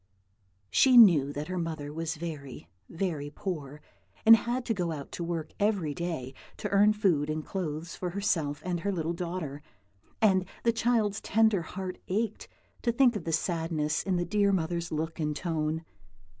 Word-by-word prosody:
She 260 -2 +6
knew 165 - +7
that 145 +1 -5
her 185 0 -3
mother 155 -3 -4
was 165 +1 -3
very, 150 - -7 0.2
very 165 -5 -3
poor, 150 -3 -5 0.4
and 225 +1 +11
had 240 +2 -2
to 225 - +1
go 175 -5 -2
out 145 -3 -6
to 175 - -4
work 165 -2 -4
every 200 -8 +1
day 160 -6 -4 0.2
to - - -3
earn 205 +1 +5
food 175 -9 +1
and 155 0 -3
clothes 165 -3 -4
for 180 - -3
herself 170 -6 -1
and 180 -1 -1
her 200 +4 -1
little 170 -3 -2
daughter; 170 -5 -4 0.6
and 190 -4 +4 0.2
the 230 - +3
child's 220 -3 +1
tender 220 -3 +3
heart 185 +2 -6
ached 215 +3 -2 0.3
to 235 - +1
think 240 0 +4
of 210 - -4
the 165 - -1
sadness 160 -2 0
in 190 -2 -1
the 175 0 0
dear 200 +2 +2
mother's 170 -2 -1
look 160 +2 -3
and 150 -1 -1
tone. 160 -1 -2
170 Hz, 170 wpm, -29 LUFS, 155-200 Hz, 0.6 s, and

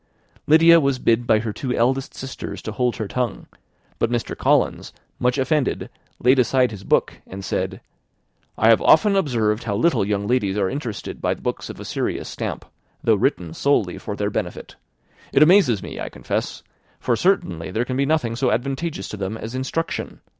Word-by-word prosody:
Lydia 165 +2 +7
was 140 -3 +1
bid 120 -1 +1
by 110 - +5
her 110 -1 -3
two 125 +1 -3
eldest 130 +3 0
sisters 135 -1 -7
to 110 - -4
hold 125 +2 0
her 110 - -4
tongue; 125 +1 -3 0.5
but - - +1
Mr. 120 -1 -2
Collins, - - +1 0.3
much 125 +1 +1
offended, 140 +1 0 0.3
laid 130 +2 +4
aside 125 0 +3
his 100 -2 -9
book, - - 0
and 95 +1 -8
said, - - -2 0.8
"I 110 - +4
have 115 - +5
often 200 +6 +5
observed 115 - 0
how 100 -3 -1
little 165 +2 +2
young 100 0 -1
ladies 105 -4 0
are 100 -2 +1
interested 130 -6 -5
by - - 0
books - - -4
of - - -8
a - - -8
serious - - -3
stamp, - - -5 0.4
though - - +4
written 85 -3 0
solely 105 -6 +1
for 105 - -5
their 105 0 -2
benefit. - - -5 0.6
It 140 - +6
amazes 155 - +4
me, - - -7
I - - -4
confess; - - -4 0.4
for 120 - +1
certainly 95 - 0
there 110 +6 -1
can 130 - -3
be 140 +1 +1
nothing 140 -7 0
so 125 +1 +1
advantageous 135 - -2
to 105 - -6
them 100 +3 -3
as 110 +2 -7
instruction. 130 +6 -3
120 Hz, 180 wpm, -22 LUFS, 105-135 Hz, 0.8 s, Lydia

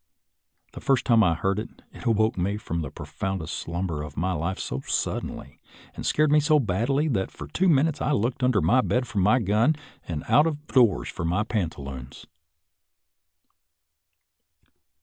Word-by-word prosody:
The - - -9
first 135 -2 +2
time 115 -3 +5
I 85 -4 +3
heard 95 +4 0
it, 110 - -9
it - - -11
awoke 110 -1 +2
me 95 +3 -1
from 85 -5 -4
the 75 - -4
pro 75 - -9
foundest 80 +3 -4
slumber 85 -2 -3
of 75 - -8
my 90 +4 0
life 85 +2 -2
so 65 - -4
suddenly, 70 0 -3 0.3
and - - -7
scared 155 -1 +3
me 150 - +6
so 150 +1 +4
badly, 125 - 0
that 95 -8 0
for - - -9
two 190 +1 +1
minutes 155 0 +2
I - - 0
looked 120 0 0
under 125 -5 +3
my 130 +1 +4
bed 125 0 0
for 105 - -2
my 105 +6 +4
gun 110 +7 +2 0.3
and 80 -4 -4
out 150 +2 +5
of 150 -1 -4
doors 120 - +3
for - - -5
my 90 +5 +1
pantaloons. 70 - -5
105 Hz, 170 wpm, -25 LUFS, 85-130 Hz, 0.3 s, me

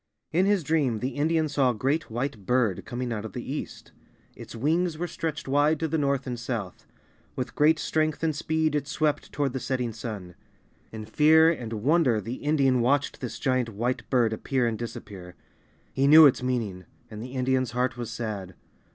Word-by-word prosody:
In 180 +4 +2
his 200 -4 +2
dream 140 -7 +1
the 125 +4 -2
Indian 155 +3 0
saw 140 -3 +2
a 120 - -1
great 140 +9 -1
White 120 -2 -4
Bird 125 -7 +1
coming 120 0 -4
out 105 -2 -4
of 110 - -8
the 125 +2 -5
east. 150 - -7 0.4
Its - - -10
wings 160 +7 0
were 175 - -2
stretched 165 -3 -4
wide 145 +3 +2
to 160 - 0
the 160 +1 -1
north 140 -2 0
and 125 -2 -4
south. 115 -6 -5 0.5
With 125 - -4
great 155 +2 +4
strength 155 0 -1
and 160 -2 +1
speed, 160 0 0
it 145 -1 -1
swept 150 -1 -1
toward 140 -3 -1
the 130 - -2
setting 125 -2 -2
sun. 105 -5 -7 0.6
In 110 -1 -7
fear 160 +6 +5
and 120 -9 -5
wonder 130 +1 +2
the 115 +5 -5
Indian 135 -4 +2
watched 140 +4 +1
this 125 - -5
giant 130 -3 0
White 120 +4 -3
Bird 120 -4 +2
appear 125 +3 -1
and 115 -1 0
disappear. 100 -6 -8 0.6
He 135 +1 +2
knew 155 +2 +9
its 135 - +4
meaning, 115 -8 -2 0.3
and 105 0 -7
the 125 +2 -8
Indian's 130 -1 +1
heart 125 0 0
was 120 -2 -5
sad. 105 -6 -5
130 Hz, 190 wpm, -26 LUFS, 115-150 Hz, 0.6 s, knew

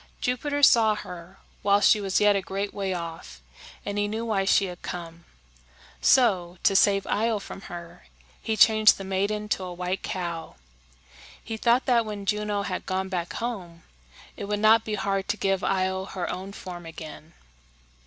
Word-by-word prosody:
Jupiter 285 +4 -1
saw 220 -5 +6
her 180 -1 -9 0.2
while 200 0 +4
she 210 0 +4
was 195 -1 +1
yet 210 -1 +4
a 195 - +1
great 195 +2 -4
way 195 -2 -2
off, 165 - -6 0.5
and 205 0 -2
he 205 - +1
knew 220 +2 -3
why 200 -4 0
she 195 - +4
had 180 -2 -8
come. 170 -1 -7 0.8
So, 185 -9 +3
to 195 - +3
save 195 0 +4
Io 225 +1 +1
from 195 -1 -9
her, 170 - -10 0.3
he 220 -1 -2
changed 215 0 +6
the 195 - -7
maiden 200 +2 -1
to 195 - -1
a 180 - -5
white 180 +1 -3
cow. 170 -3 -5 0.9
He 225 - -5
thought 235 +3 +2
that 240 -2 +3
when 210 -2 -6
Juno 210 0 -1
had 185 -2 -4
gone 190 0 -2
back 175 -2 -3
home, 185 -8 -5 0.5
it - - -6
would 205 +1 -1
not 220 +1 +5
be 215 -1 -3
hard 195 -1 -1
to 205 - -1
give 195 -2 0
Io 190 0 0
her 190 -2 -4
own 190 +2 -6
form 175 -4 -8
again. 160 0 -10
195 Hz, 175 wpm, -26 LUFS, 180-215 Hz, 0.9 s, saw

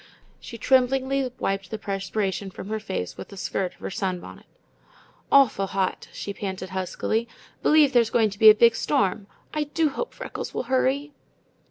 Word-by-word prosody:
She 230 - -9
tremblingly 265 +2 +2
wiped 195 -1 -2
the 220 - -4
perspiration 195 -1 -3
from 190 +1 -9
her 220 0 -2
face 190 - -4
with - - -8
the 200 - -12
skirt 185 -1 -2
of - - -29
her - - -5
sunbonnet. 185 -3 -4 0.8
"Awfu' 230 -8 +5
hot," 190 -1 -2
she 200 - -6
panted 190 -2 -5
huskily. 190 +5 -2 0.3
"B'lieve 300 -3 +5
there's 235 -2 +4
going 225 -3 +2
to 200 - -10
be 220 - +10
a 215 - +8
big 230 +1 +5
storm. 205 -6 0 0.3
I 305 -1 0
do 310 +1 +1
hope 480 - -5
Freckles - - -6
will - - -1
hurry." 265 +3 0
220 Hz, 170 wpm, -25 LUFS, 195-265 Hz, 0.8 s, be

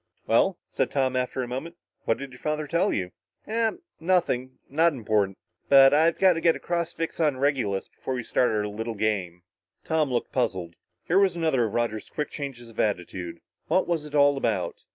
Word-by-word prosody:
"Well," - - +3
said - - -1
Tom 130 -2 0
after 130 0 -1
a - - -5
moment, 135 +8 -5 0.3
"what 115 - +2
did 140 -1 -7
your 125 - -13
father 155 0 -2
tell 170 +6 +1
you?" 90 -2 -2 0.4
"Ah 225 0 +1 0.3
nothing 160 -8 0
not 160 +4 +3
important. 105 -6 0 0.3
But 135 0 +8
I've 160 +3 +4
got 190 -1 +5
to 165 - -4
get 165 -1 +4
a - - -7
cross 170 -1 -2
fix 165 0 -4
on 150 -5 +2
Regulus 130 -8 0
before 130 - -5
we 125 - -3
start 125 - +2
our 105 -1 0
little 110 +2 -4
games." 95 -5 -1 0.4
Tom 160 -3 +1
looked 120 - -1
puzzled. 95 -9 -1 0.3
Here 180 +4 +3
was 195 -3 +3
another 160 -8 +2
of 110 - -4
Roger's 115 -3 -1
quick 150 - -4
changes 125 -5 -7
of 110 - -13
attitude. 90 -4 -2 0.3
What 185 - +2
was 170 -3 0
it 150 0 -7
all 145 -1 +5
about? 105 -9 -2
130 Hz, 195 wpm, -26 LUFS, 110-160 Hz, 0.4 s, But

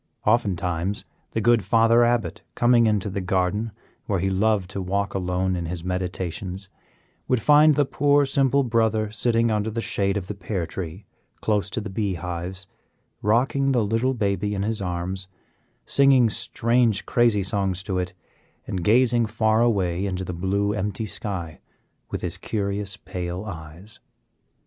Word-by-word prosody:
Oftentimes 95 -4 0 0.2
the 110 - -2
good 120 -1 +4
Father 115 +1 +4
Abbot, 120 -1 0
coming 120 -1 +4
into 105 -2 +1
the 100 0 -3
garden, 95 +4 0 0.4
where 100 - +1
he 95 +2 0
loved 100 -1 +1
to 100 - -4
walk 100 +2 -1
alone 90 0 -1
in 85 -2 -3
his 85 0 -5
meditations, 90 +1 -4 0.6
would 125 - +2
find 150 +4 +6
the 145 - +3
poor, 145 +1 +3
simple 135 0 +2
Brother 110 -3 +1
sitting 115 +1 +1
under 105 0 0
the 115 +1 -4
shade 100 -3 0
of 95 - -4
the 105 - -5
pear 95 -2 -3
tree, 85 +3 -7 0.3
close 105 -2 0
to - - -3
the 105 -2 -6
bee 100 -1 -1
hives, 90 +2 -5 0.6
rocking 135 +5 +2
the 120 -4 +2
little 115 +5 +1
baby 105 -1 -1
in 100 - -1
his 110 0 -1
arms, 95 +1 -3 0.6
singing 135 -5 +5
strange, 115 0 +1
crazy 120 -5 +3
songs 95 -1 -1
to 95 -2 -2
it, 90 0 -4 0.5
and 90 -3 -3
gazing 120 +2 +4
far 110 0 +2
away 95 -5 +1
into 95 -1 -3
the 90 - -5
blue, 100 +4 0
empty 105 +1 -2
sky 95 -5 -4 0.5
with - - -4
his - - -3
curious, 100 -1 -2
pale 90 +1 -5
eyes. 85 +2 -9
100 Hz, 155 wpm, -24 LUFS, 95-115 Hz, 0.6 s, find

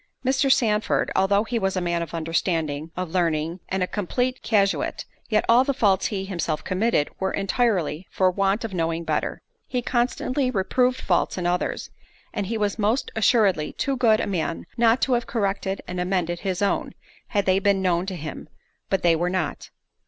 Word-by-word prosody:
Mr. 270 +1 +3
Sandford, 220 -5 +2
although 200 +2 +3
he 230 +1 -2
was 195 -1 0
a - - +3
man 170 -1 -1
of 170 0 -5
understanding, 160 -2 -1
of 180 -3 -3
learning, 165 -1 0
and 190 0 0
a - - 0
complete 245 +7 -2
casuist, 200 -3 +1 0.2
yet 215 -2 +2
all 235 +2 +6
the 275 0 -1
faults 200 -6 +3
he 195 -3 -3
himself 170 -5 -2
committed, 185 -5 +1
were 190 - 0
entirely—for 190 - 0
want 195 +4 +1
of 215 - -6
knowing 165 -1 -1
better. - - -2 0.2
He 250 -1 -2
constantly 255 +2 0
reproved 250 +4 +1
faults - - 0
in 180 - -2
others, 180 +1 -1 0.4
and 200 - -2
he 225 +2 -2
was 210 0 -1
most 215 +5 +1
assuredly 210 -8 +3
too 275 - -1
good 225 -4 +4
a - - 0
man 170 -4 -2
not 235 +1 +3
to 260 - +2
have 240 -1 0
corrected 200 -3 -1
and 180 0 -4
amended 180 -2 -1
his 190 0 -2
own, 200 - 0 0.3
had 200 -2 0
they 185 0 +3
been 195 -1 +2
known 180 0 +1
to 190 - -3
him—but 170 +4 -6
they 170 -1 +5
were 175 +2 0
not. 185 0 -3
195 Hz, 180 wpm, -24 LUFS, 175-225 Hz, 0.4 s, all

